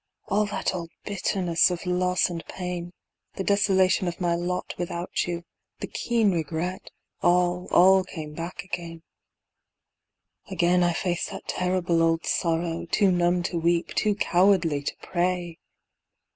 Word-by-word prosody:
All 210 +1 +2
that 205 - -2
old 170 -2 -5 0.2
bitterness 185 -4 +1
of 180 0 -4
loss 180 0 +2
and 170 -2 -5
pain, 180 -1 -5 0.4
The 195 - -3
desolation 190 -2 +3
of 175 - -4
my 175 -2 +1
lot 175 +1 -2
without 175 0 -2
you, 170 -1 -3 0.4
The - - -3
keen 230 -4 +1
regret, 170 +3 -3 0.3
all, 180 0 +2
all 190 +1 +6
came 155 -5 -8
back 170 +3 -6
again. 170 -3 -6 1.5
Again 180 -1 +2
I 175 -1 +3
faced 175 0 -2
that - - -9
terrible 180 -2 0
old 165 0 +2
sorrow; 165 0 -1
Too 200 +2 +3
numb 175 0 +2
to 170 -1 -2
weep, 170 +1 +1
too 210 -2 +1
cowardly 180 -6 +3
to 140 - -4
pray. 175 -2 -1
175 Hz, 140 wpm, -26 LUFS, 170-185 Hz, 1.5 s, all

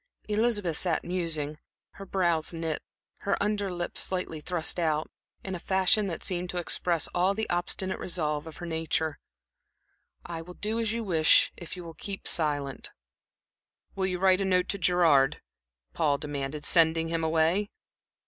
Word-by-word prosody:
Elizabeth 210 -6 +1
sat 175 -4 0
musing, 160 -4 -1 0.3
her 195 - -10
brows 170 -4 +1
knit, 165 -2 -2 0.4
her 200 - -1
under 205 -1 0
lip 175 -1 -4
slightly 180 -4 -1
thrust 175 +1 -1
out, 155 -2 0 0.3
in 190 - -4
a 180 - -4
fashion 190 +3 +2
that 170 - -4
seemed 180 -1 -1
to 180 - -3
express 175 -1 +1
all 185 +3 +1
the 220 +1 -2
obstinate 180 +2 -1
resolve 155 -4 -1
of 160 - -9
her 175 - -6
nature. 160 -2 -1 1.1
"I 165 -1 -5
will 180 +2 -11
do 220 +2 -2
as 225 -2 0
you 230 0 -2
wish, 165 -6 +4
if 175 0 -8
you 180 - -7
will 165 -1 -9
keep 195 +4 -5
silent." 145 -4 -1 1.0
"Will 190 -1 -1
you 180 -1 -1
write 190 +1 +4
a - - +2
note 180 -1 +2
to 200 - 0
Gerard," 165 -7 +4 0.5
Paul 150 -4 +2
demanded, 145 0 -4
"sending 165 -1 +4
him 165 0 -1
away?" 165 +6 +2
175 Hz, 160 wpm, -28 LUFS, 160-190 Hz, 1.1 s, wish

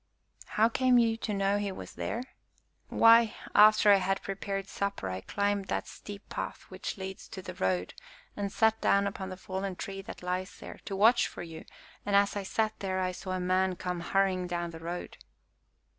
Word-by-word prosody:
"How 220 +1 +6
came 250 +2 +3
you 230 -1 +4
to 225 - -4
know 200 0 +1
he 205 -1 -2
was 185 - -8
there?" 235 - -3 0.6
"Why, 230 -1 +6 0.2
after 215 0 +7
I 200 - +8
had 195 +1 -1
prepared 195 0 -4
supper 200 - -3
I 95 0 -4
climbed 200 - -1
that - - -2
steep 205 0 -10
path - - -5
which - - -5
leads 190 0 -7
to 190 - -8
the 185 - -6
road 90 - -1 0.4
and 200 -1 -3
sat 220 0 +2
down 200 0 +3
upon 195 -1 -4
the 185 - -7
fallen 190 0 -4
tree 195 +2 -6
that 190 - -10
lies 180 +1 -3
there, - - -10
to 195 - -4
watch 225 +5 +5
for - - -8
you, 160 -1 -9 0.4
and, 205 - 0
as 200 0 +4
I 205 - -1
sat 215 +3 -1
there, 190 -1 -2
I 185 0 0
saw 185 +1 -5
a 185 - -1
man 185 +1 +1
come 180 0 -3
hurrying 185 0 +1
down 175 -1 -3
the 165 - -9
road." 170 +2 -6
195 Hz, 195 wpm, -30 LUFS, 185-205 Hz, 0.6 s, I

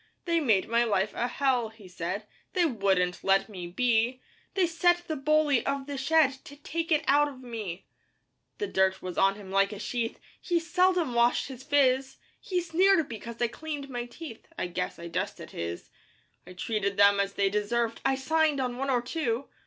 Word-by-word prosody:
'They 335 -1 +2
made 220 -11 +2
my 235 +1 +3
life 205 -3 0
a 240 - -1
hell,' 250 -3 +1
he 220 -3 -15
said; 180 +4 -4 0.3
'They 360 -2 +3
wouldn't 195 - +1
let 195 0 +3
me 185 -5 -7
be; 240 +5 +1 0.4
'They 380 -2 +4
set 350 +1 +2
the 315 - -2
bully 300 -2 +2
of 275 -1 -2
the 285 0 -5
shed 275 -1 +3
'To 285 - -11
take 330 +4 -4
it 310 0 +3
out 290 +1 +5
of 265 -3 -10
me. 215 -7 -6 0.7
'The 420 - -2
dirt 190 - +1
was 180 -1 -5
on 195 0 +4
him 200 -2 -10
like 195 +1 +3
a 210 - -6
sheath, 230 +2 -3 0.2
'He 350 -2 +1
seldom 350 -3 +2
washed 235 +3 +2
his 260 -2 -8
phiz; 265 -2 +2 0.2
'He 365 -2 -1
sneered 350 -1 +3
because 235 +1 -7
I 240 - +2
cleaned 285 +2 -6
my 240 -1 -3
teeth 265 -3 -10
'I - - -1
guess 175 - -3
I 170 - -7
dusted 170 - -4
his! 85 +1 -6 0.6
'I 180 - -10
treated 200 +1 -2
them 200 0 +6
as 200 0 0
they 195 -1 +1
deserved 230 +3 -1
'I 270 - +2
signed 305 +2 +1
on 250 -2 -2
one 270 +1 -2
or 245 -2 +2
two! 255 -3 -2
245 Hz, 190 wpm, -28 LUFS, 205-300 Hz, 0.7 s, them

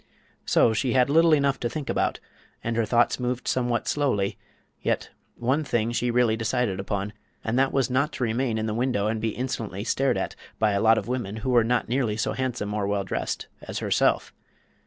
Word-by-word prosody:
So 115 - +4
she 120 +2 0
had 130 +1 +3
little 165 +2 +5
enough 140 -2 +3
to 120 - -1
think 145 +3 -5
about, - - 0 0.4
and 115 0 -1
her 115 -1 +2
thoughts 120 +3 +3
moved 125 0 -2
somewhat 120 -2 0
slowly; 115 -10 +1 0.5
yet - - -1 0.2
one 130 +6 0
thing 120 -5 0
she 120 +1 0
really 120 -2 +3
decided 115 -3 -1
upon, 100 +1 -3 0.3
and 110 - -2
that 135 0 +3
was 135 -2 +1
not 140 +4 +1
to - - -3
remain 115 0 0
in 110 - -1
the 110 - -1
window 120 -3 0
and 110 0 -1
be 110 -1 -1
insolently 110 -6 -3
stared 135 +4 +1
at - - -3 0.2
by 110 -1 +2
a 100 0 +1
lot 110 0 +5
of - - -2
women 120 -5 -3
who 130 - +1
were 120 -2 +5
not 120 +2 +1
nearly 120 -4 0
so 110 - 0
handsome 125 -6 -2
or 105 -2 -1
well 100 -1 0
dressed 95 - -3 0.2
as - - -6
herself. - - +1
120 Hz, 205 wpm, -26 LUFS, 110-130 Hz, 0.5 s, little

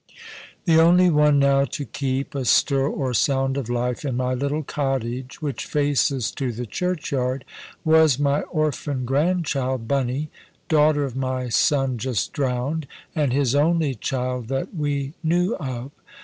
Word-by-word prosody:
The 165 -3 +5
only 175 +2 +5
one 150 -1 +4
now 140 0 +4
to 140 +1 -4
keep 135 -1 -3
a 140 -2 -2
stir 135 +2 +3
or 130 -3 -2
sound 135 +3 +1
of 135 -4 -3
life 120 +2 -1
in 130 -4 -2
my 130 0 0
little 140 +4 -1
cottage, 130 0 -3
which 145 -3 -3
faces 145 -4 +1
to 130 -3 -3
the 120 +2 -5
churchyard, 140 - -2 0.4
was 160 -4 +5
my 145 0 +1
orphan 150 -4 -2
grandchild 135 -4 0
"Bunny," 135 +3 -1 0.4
daughter 150 -2 +3
of 135 -3 -4
my 130 -1 -2
son 135 0 +2
just 120 -4 -2
drowned, 135 +3 -1 0.3
and 150 -5 +1
his 135 -1 +1
only 155 0 +2
child 125 0 -3
that 135 - -3
we 145 -3 -2
knew 175 +5 +1
of. 130 -3 -5
140 Hz, 150 wpm, -23 LUFS, 130-150 Hz, 0.4 s, The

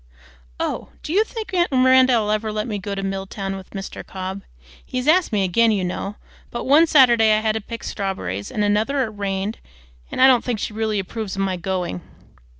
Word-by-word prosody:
Oh! - - -3
do 310 - -4
you 415 +4 +4
think 445 -2 -7
aunt 350 -2 +2
Mirandy'll 255 -4 +4
ever 215 0 -1
let 215 0 -2
me 210 -3 -3
go 200 +1 -4
to 195 - -4
Milltown 195 0 -4
with 190 -1 -10
Mr. 195 -1 -7
Cobb? 190 +1 -6 0.4
He's 255 +2 -4
asked 350 +3 +4
me 205 -3 +1
again, 225 +5 +3
you 205 -4 +1
know; 195 +3 -3 0.3
but 240 - -5
one 300 +5 +6
Saturday 240 -7 +6
I 215 - +3
had 220 0 +1
to 220 - -3
pick 230 +2 -8
strawberries, 100 - -4
and 210 - -1
another 220 +7 +1
it 225 - -3
rained, 200 0 -3 0.5
and - - -4
I 260 - +8
don't 255 -3 +5
think 245 -3 -1
she 210 - -4
really 220 -1 -1
approves 200 +1 -4
of 195 - -1
my 190 -1 0
going. 180 - -3
215 Hz, 205 wpm, -22 LUFS, 195-250 Hz, 0.5 s, I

